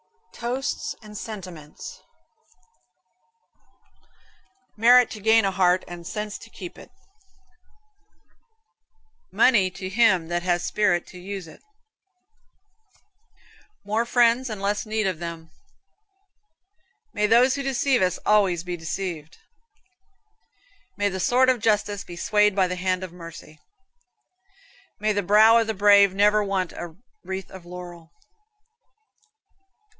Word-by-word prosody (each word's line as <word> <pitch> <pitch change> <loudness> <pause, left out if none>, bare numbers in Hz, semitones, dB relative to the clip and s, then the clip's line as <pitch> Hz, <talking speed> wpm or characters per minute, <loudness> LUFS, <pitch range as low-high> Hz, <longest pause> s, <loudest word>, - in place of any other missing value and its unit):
TOASTS 250 +4 -4
AND 210 0 -12
SENTIMENTS 180 -9 -9 2.7
Merit 245 +3 +5
to 215 - -7
gain 220 0 +4
a 195 - +1
heart, 185 -1 +2
and 175 -1 -9
sense 210 -2 -5
to - - -14
keep 180 -2 -10
it. - - -14 2.4
Money 210 -8 +4
to 185 +1 -7
him 190 -6 +2
that 175 0 -1
has 175 -1 0
spirit 175 -4 +1
to 180 - -13
use 190 -1 -7
it. 160 - -15 2.2
More 215 +3 0
friends 240 +1 +2
and 215 -2 -6
less 200 +1 -1
need 215 0 -1
of 185 -4 -2
them. 165 -1 -7 1.6
May 210 - +1
those 245 +4 +5
who 280 - -3
deceive 270 -2 +1
us 185 -1 +1
be - - -22
always 195 -5 +2
deceived. 170 -2 -5 1.6
May 205 0 +1
the 190 -1 -5
sword 250 +7 +3
of 255 -2 +2
justice 210 -2 0
be 175 - -10
swayed 210 +3 +2
by 190 -2 +3
the 180 - -3
hand 185 0 -1
of 180 -2 -8
mercy. 165 -3 -12 1.4
May 215 0 0
the 205 - 0
brow 215 +4 +6
of 225 - -1
the 220 - -2
brave 200 -1 +5
never 210 +1 +3
want 190 -3 -2
a 170 -2 -8 0.3
wreath 190 0 -6
of 190 -2 -11
laurel. 175 -2 -10
195 Hz, 120 wpm, -24 LUFS, 180-215 Hz, 2.7 s, brow